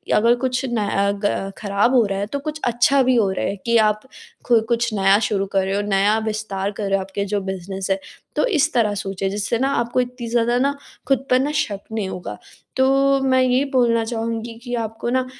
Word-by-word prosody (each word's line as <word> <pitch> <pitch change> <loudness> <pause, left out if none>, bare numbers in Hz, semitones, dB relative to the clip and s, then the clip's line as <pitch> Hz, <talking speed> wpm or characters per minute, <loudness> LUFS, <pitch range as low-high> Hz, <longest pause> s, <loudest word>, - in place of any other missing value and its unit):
अगर 235 +3 +4
कुछ 255 +1 -1
न 240 -2 -2
अ, 200 0 +1
ग 195 -1 -1
खराब 205 +4 +1
हो 235 - +5
रहा 195 0 -2
है 200 - -1
तो 280 +6 -4
कुछ 305 +1 -5
अच्छा 245 +3 +3
भी 255 0 +3
हो 210 -5 +2
रहा 190 - -2
है - - -2
कि 235 0 +3
आप 210 0 -1 0.5
खु 235 -2 +5
कुछ 235 -1 0
नया 195 0 +4
शुरू 200 -3 0
कर 195 -1 +2
रहे 195 +1 -1
हो 205 - +1
नया 200 +2 +3
विस्तार 210 -2 -3
कर 205 +1 -6
रहे - - -1
हो 195 - 0
आपके 195 +1 -4
जो 205 0 -1
बिज़नेस 190 0 -5
है। 195 - +1 0.4
तो - - +2
इस 315 - +1
तरह 220 -4 +2
सोचिए 195 -1 -3
जिससे 205 +3 -1
न 265 - +1
आपको 250 -2 +1
इतनी 250 -1 -6
ज़्यादा 240 +1 +2
न 280 +1 +2 0.4
ख़ुद 270 -1 +1
पर 255 - +4
न 280 +3 0
शक 300 -10 -1
नहीं 215 -4 -2
होगा। 175 - -6 0.4
तो 275 +1 +3
मैं 260 -1 +3
यही 255 +1 +3
बोलना 235 -3 +3
चाहूँगी 230 0 -3
कि 245 -1 -6
आपको 225 0 -3
न 255 +1 +1
230 Hz, 225 wpm, -21 LUFS, 200-255 Hz, 0.5 s, हो